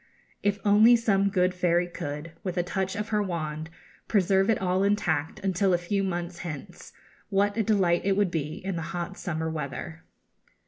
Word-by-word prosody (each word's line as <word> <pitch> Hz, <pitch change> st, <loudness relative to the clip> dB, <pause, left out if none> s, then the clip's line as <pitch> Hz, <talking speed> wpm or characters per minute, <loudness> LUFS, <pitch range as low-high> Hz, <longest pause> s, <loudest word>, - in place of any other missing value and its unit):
If 205 Hz, 0 st, +1 dB
only 215 Hz, +4 st, +7 dB
some 200 Hz, -4 st, +2 dB
good 180 Hz, -1 st, +2 dB
fairy 175 Hz, -1 st, +2 dB
could, 150 Hz, -1 st, -6 dB
with 185 Hz, -2 st, -3 dB
a 175 Hz, -, +2 dB
touch 190 Hz, +1 st, -2 dB
of 210 Hz, +1 st, -3 dB
her 210 Hz, -1 st, +1 dB
wand, 160 Hz, -4 st, -3 dB, 0.4 s
preserve 195 Hz, -1 st, +3 dB
it 225 Hz, -, +4 dB
all 185 Hz, 0 st, +1 dB
intact 175 Hz, -7 st, 0 dB
until 190 Hz, -1 st, +2 dB
a -, -, +2 dB
few 195 Hz, +3 st, -1 dB
months 175 Hz, -2 st, -3 dB
hence, 155 Hz, -6 st, -8 dB, 0.4 s
what 200 Hz, +1 st, +2 dB
a 225 Hz, -, +1 dB
delight 195 Hz, -6 st, +2 dB
it 195 Hz, 0 st, +1 dB
would 200 Hz, -4 st, +2 dB
be 155 Hz, -2 st, -2 dB
in 190 Hz, -2 st, -2 dB
the -, -, -2 dB, 0.2 s
hot 175 Hz, +2 st, -4 dB
summer 160 Hz, -4 st, -3 dB
weather! 160 Hz, +1 st, -5 dB
185 Hz, 180 wpm, -27 LUFS, 170-200 Hz, 0.4 s, only